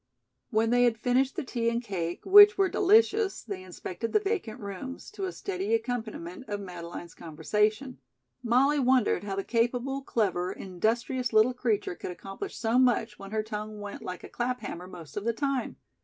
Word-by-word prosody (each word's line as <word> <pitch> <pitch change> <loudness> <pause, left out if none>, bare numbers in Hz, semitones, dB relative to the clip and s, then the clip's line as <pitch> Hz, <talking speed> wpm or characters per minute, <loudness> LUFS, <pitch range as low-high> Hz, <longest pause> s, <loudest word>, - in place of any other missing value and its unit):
When 225 +1 +2
they 245 0 +5
had 235 -2 +2
finished 255 +3 +1
the - - -2
tea 235 -3 -1
and 235 0 0
cake, 180 -7 -4
which 410 +2 +9
were 390 -1 +3
delicious, 425 +2 +3
they 200 -4 -6
inspected 185 +3 -6
the 425 - +5
vacant 395 - -3
rooms, 205 +7 -7
to 400 -2 -4
a 370 - -3
steady 395 +4 -2
accompaniment 235 - -4
of 205 -1 -2
Madeleine's 175 -2 -8
conversation. 210 - -1 0.4
Molly 260 +5 +3
wondered 255 -5 +2
how 195 -1 -3
the 195 - -2
capable, 245 +4 0
clever, 185 -8 0
industrious 235 +7 -1
little 220 +3 +5
creature 230 -7 -1
could - - -7
accomplish 195 - -7
so 230 +1 +2
much 245 -3 +2
when 195 0 -9
her 215 +1 -1
tongue 215 0 -6
went 205 0 -7
like 180 -1 -6
a - - -9
clap 250 +1 -2
hammer 180 +1 -6
most 165 -4 -11
of 205 - -2
the 230 +1 0
time. 275 0 -2
230 Hz, 180 wpm, -28 LUFS, 200-265 Hz, 0.4 s, which